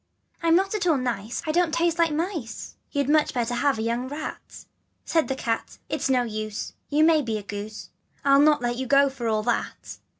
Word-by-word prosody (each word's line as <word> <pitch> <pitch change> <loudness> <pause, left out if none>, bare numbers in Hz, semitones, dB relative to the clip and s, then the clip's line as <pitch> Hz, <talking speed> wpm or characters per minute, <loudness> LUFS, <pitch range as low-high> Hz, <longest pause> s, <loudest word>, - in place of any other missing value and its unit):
I'm 330 0 +4
not 385 +3 +2
at 405 -4 -1
all 320 -4 +4
nice, 240 -3 -3
I 310 - 0
don't 345 0 +2
taste 340 0 +1
like 335 -2 +4
mice: 315 - -4 0.2
You'd 285 -2 0
much 300 -2 +3
better 240 0 0
have 275 +1 +1
a 220 - -2
young 235 +2 -1
rat. 295 +3 -7
" - - -47
Said 325 -2 +1
the 265 - -1
cat, 230 -3 -3
" - - -46
It's - - -1
no 255 -2 +3
use, 215 -2 -4 0.2
You 300 +1 +3
may 320 -1 +5
be 225 -5 -2
a 210 - -7
goose, 205 +1 -7 0.3
I'll 275 0 +6
not 300 -3 +4
let 240 0 -1
you 260 0 -3
go 275 +1 +5
for 250 -3 -4
all 215 -1 +1
that. 240 +1 -3
270 Hz, 225 wpm, -25 LUFS, 230-310 Hz, 0.3 s, I'll